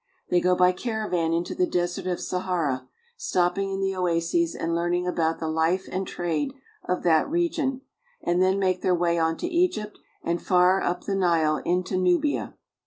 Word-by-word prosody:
They 175 - +4
go 180 0 +3
by 180 0 +5
caravan 185 -5 -2
into 170 +1 -1
the 180 - +1
Desert 175 +1 -2
of 180 -1 -1
Sahara, 165 -9 -2 0.3
stopping 195 - 0
in 195 0 -3
the 195 0 0
oases 170 -2 0
and 165 0 -2
learning 175 +1 0
about 165 -2 0
the 160 - -4
life 160 +4 0
and 190 +1 -2
trade 180 - -2 0.3
of 180 - -1
that 160 - +3
region; 310 -5 0 0.4
and 175 +1 0
then 190 +1 +3
make 185 -2 +1
their 180 - +2
way 170 -1 +1
on 160 0 +1
to - - -3
Egypt 340 - 0 0.2
and 170 0 -1
far 180 +1 +4
up 180 0 -1
the 200 - -2
Nile 165 -5 +2
into 180 +1 0
Nubia. 185 - +1
180 Hz, 175 wpm, -25 LUFS, 170-195 Hz, 0.4 s, by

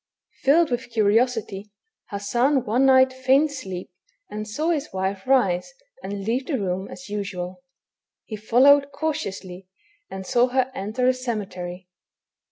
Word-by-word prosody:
Filled 310 +2 +4
with 245 +1 -2
curiosity, 220 -2 +1 0.4
Hassan 240 +7 +1
one 245 +6 +2
night 260 0 +5
feigned 265 +4 +3
sleep, 190 -11 -7 0.4
and 215 0 -5
saw 305 +11 -1
his 305 -3 -2
wife 190 +2 -3
rise 250 - +2 0.3
and 200 0 -5
leave 250 +4 -1
the 285 - 0
room 190 -2 -2
as 270 - -10
usual. 200 -1 -5 0.6
He 220 - -6
followed 275 +6 +4
cautiously, 200 - -4 0.4
and 190 0 -7
saw 245 +5 +3
her 260 0 0
enter 235 +2 -1
a 255 - +5
cemetery. 190 -7 -5
235 Hz, 135 wpm, -23 LUFS, 195-265 Hz, 0.6 s, night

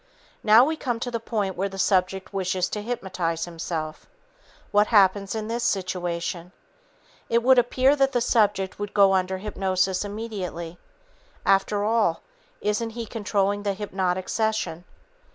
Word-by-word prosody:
Now 220 +3 +7
we 315 +2 -1
come 245 -6 -2
to 245 - -3
the 230 - -2
point 210 -4 -2
where 195 +2 -1
the 195 - -9
subject 190 0 +1
wishes 185 -1 0
to 210 - -4
hypnotize 185 -7 -3
himself. 165 -2 -5 0.6
What 205 +1 +4
happens 200 -1 +3
in 215 -1 -3
this 235 +1 -2
situation? 180 -3 -2 0.8
It 235 0 +2
would 260 0 +6
appear 255 +3 +3
that 270 -1 +2
the 245 - +1
subject 210 -6 +1
would 205 0 -5
go 195 -1 +6
under 190 0 0
hypnosis 190 -2 -1
immediately. 200 -6 -6 0.7
After 200 +1 +2
all, 215 -6 +1 0.4
isn't 210 +2 0
he 230 - -3
controlling 205 -2 -1
the 200 -1 -1
hypnotic 185 -2 -2
session? 220 -6 -1
200 Hz, 145 wpm, -25 LUFS, 185-225 Hz, 0.8 s, Now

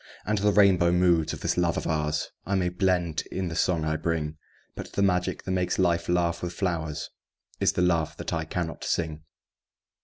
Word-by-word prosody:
And 105 0 +1
the 105 +1 +3
rainbow 95 -4 +5
moods 85 -3 +3
of - - -7
this - - 0
love 85 -1 +1
of - - -2
ours 75 -1 -1
I 100 - -1
may 90 -2 +1
blend 90 -3 0
in 95 -2 -2
the 80 - -5
song 85 -3 +1
I 80 0 0
bring; 80 -2 -2 0.4
But - - -8
the 100 - +1
magic 90 -2 +1
that 95 - -4
makes 90 -1 0
life 85 -2 +1
laugh 85 -1 +1
with 90 -1 -4
flowers 80 -5 -2 0.5
Is - - +3
the 90 - +1
love 85 -3 +1
that - - -4
I 80 -1 0
cannot 80 0 -4
sing. 80 -2 -1
85 Hz, 195 wpm, -27 LUFS, 80-90 Hz, 0.5 s, rainbow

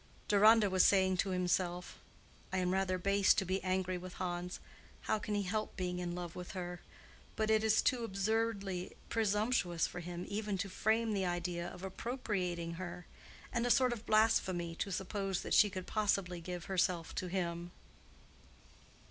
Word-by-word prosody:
Deronda 215 +1 +6
was 185 -1 +4
saying 190 -1 +4
to 195 - +1
himself, 180 -1 -1 0.5
"I 190 - -1
am 180 0 +1
rather 190 -1 +1
base 200 +2 +4
to 190 - +1
be 185 +2 -1
angry 185 -1 0
with 180 0 -8
Hans. 180 0 -3 0.4
How 215 - 0
can 210 0 -3
he 205 - +1
help 215 +3 -2
being 180 -1 -2
in 175 -1 -3
love 175 -1 -6
with 180 +1 -7
her? 180 -2 -5 0.5
But 220 0 +1
it 220 0 +4
is 220 -1 +4
too 250 -2 +2
absurdly 200 -3 -1 0.2
presumptuous 210 -5 +1
for 175 - -5
him 175 +1 -6
even 205 -1 -2
to 200 +2 -3
frame 220 +3 +1
the 190 -2 0
idea 175 0 -2
of 180 +1 -9
appropriating 190 -5 -3
her, 180 0 -6 0.5
and 235 -2 +1
a 245 - +1
sort 255 0 +4
of 230 -1 -9
blasphemy 190 -6 +2
to 200 - -2
suppose 195 0 -2
that - - -2
she 210 - +7
could 185 -2 -5
possibly 195 -5 0
give 175 0 -6
herself 180 -3 0
to 185 - -3
him." 175 -1 -2
190 Hz, 170 wpm, -34 LUFS, 180-210 Hz, 0.5 s, she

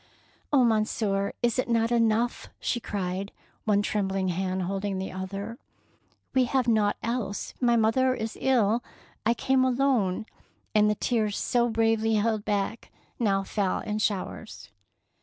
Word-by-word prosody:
"Oh, 275 -3 +5
Monsieur, 215 -3 +1
is 240 0 +2
it 255 - -1
not 230 0 +2
enough?" 230 0 +1
she 240 - -1
cried, 195 -2 -3 0.3
one 205 -2 +3
trembling 195 -2 0
hand 185 +1 -1
holding 195 +1 -2
the 190 0 -4
other; 195 +5 -5 0.7
"we 260 -1 +4
have 255 0 0
naught 215 -3 +2
else, 230 -4 -3
my 240 -1 +4
mother 255 +4 +3
is 220 -1 -4
ill, 240 -3 +2 0.2
— - - -30
I 235 - +3
came 265 +1 +2
alone 250 -7 +1 0.2
"; - - -41
and 210 -1 +4
the 210 - +1
tears 215 -1 0
so 240 -1 +1
bravely 225 0 +2
held 215 0 +1
back 205 +2 -2 0.3
now 195 -4 +2
fell 195 -1 -1
in 215 -1 -3
showers. 205 - -3
220 Hz, 150 wpm, -27 LUFS, 200-235 Hz, 0.7 s, Oh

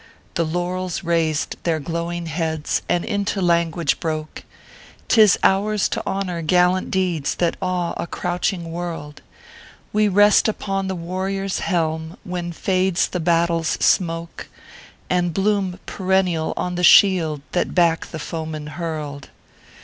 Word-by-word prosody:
The 170 - +1
Laurels 175 +2 -2
raised 165 -2 0
their 165 -2 0
glowing 170 +2 -3
heads, 160 -1 -2
and 175 -1 +1
into 200 0 -1
language 170 -3 +1
broke: 155 -1 -4 0.3
" - - -22
Tis 215 -5 +6
ours 205 +1 +3
to - - -2
honor 190 -3 -2
gallant 180 +3 +2
deeds 180 -6 0
that 175 -1 0
awe 180 -2 -1
a - - -3
crouching 175 -1 -2
world; 165 -4 -6 0.7
We 210 0 +3
rest 205 +2 +5
upon 195 -2 -2
the 190 - -2
warrior 185 +3 -3
s 195 - -2
helm 160 -2 -1
when 175 -1 -4
fades 185 +1 +1
the 180 - -3
battle 170 0 +2
s 165 - -1
smoke, 165 -2 0 0.6
And 175 -2 0
bloom 195 -2 0
perennial 185 -4 0
on 180 - -2
the 180 0 -2
shield 170 -7 +5
that 180 - -1
back 170 -2 +3
the 160 - -7
foeman 155 -1 -5
hurled." 150 -4 -5
175 Hz, 140 wpm, -21 LUFS, 165-185 Hz, 0.7 s, Tis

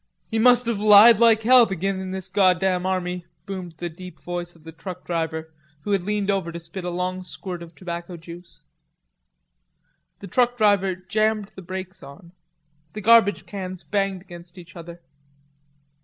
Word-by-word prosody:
"He 225 - -2
must 245 +1 +5
have 230 -3 -1
lied 210 +2 +8
like 225 -2 +4
hell 245 0 +6
to 195 - -3
git 195 +3 -2
in 190 0 -5
this 190 0 -4
goddam 185 -1 +2
army," 180 -2 -3 0.2
boomed 185 -3 -7
the 175 +2 -6
deep 175 0 -11
voice 175 0 -6
of 165 - -21
the 160 - -10
truck 180 +2 -9
driver, 160 -1 -3 0.3
who 205 - -4
had 200 -2 +2
leaned 205 +1 -1
over 190 -4 -2
to 170 - -7
spit 180 +2 -8
s 180 - -3
long 180 +1 -3
squirt 180 0 -7
of 170 0 -12
tobacco 175 -1 -7
juice. 170 +1 -13 1.6
The - - -11
truck 245 +3 +1
driver 200 -4 +2
jammed 215 +2 -1
the 190 - -10
brakes 185 +1 -7
on. 155 +5 -13 0.6
The 215 - -6
garbage 225 -1 +4
cans 185 -3 -7
banged 195 -3 -2
against 175 -1 -13
each 170 -1 -13
other. 170 0 -11
185 Hz, 170 wpm, -23 LUFS, 175-205 Hz, 1.6 s, lied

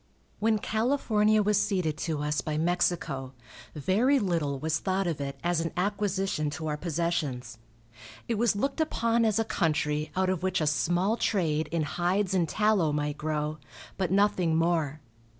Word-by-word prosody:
When 220 0 +2
California 215 -2 +2
was 205 0 +3
ceded 180 -7 0
to 155 -3 -2
us 150 -1 0
by 155 +1 -3
Mexico, 165 -5 0 0.4
very 210 - +2
little 165 - 0
was 160 +3 -1
thought 190 0 -1
of 165 -5 -2
it 140 -1 -5
as 175 -1 +1
an 165 - -2
acquisition 195 -4 0
to 160 - -5
our 150 -1 -1
possessions. 150 -8 -2 0.7
It 230 -3 -1
was 235 -3 +3
looked 275 +9 -1
upon 230 -6 +1
as 215 -1 +2
a 225 - +1
country 155 -4 0
out 185 0 +2
of 185 -3 -2
which 185 0 0
a 155 - 0
small 175 +8 +1
trade 160 -9 0
in 165 -2 0
hides 180 +5 0
and 175 -4 +1
tallow 210 -7 +2
might 150 0 -2
grow, 155 0 -2 0.4
but 185 -3 -1
nothing 190 -4 +2
more. 160 -3 0
175 Hz, 165 wpm, -28 LUFS, 155-205 Hz, 0.7 s, was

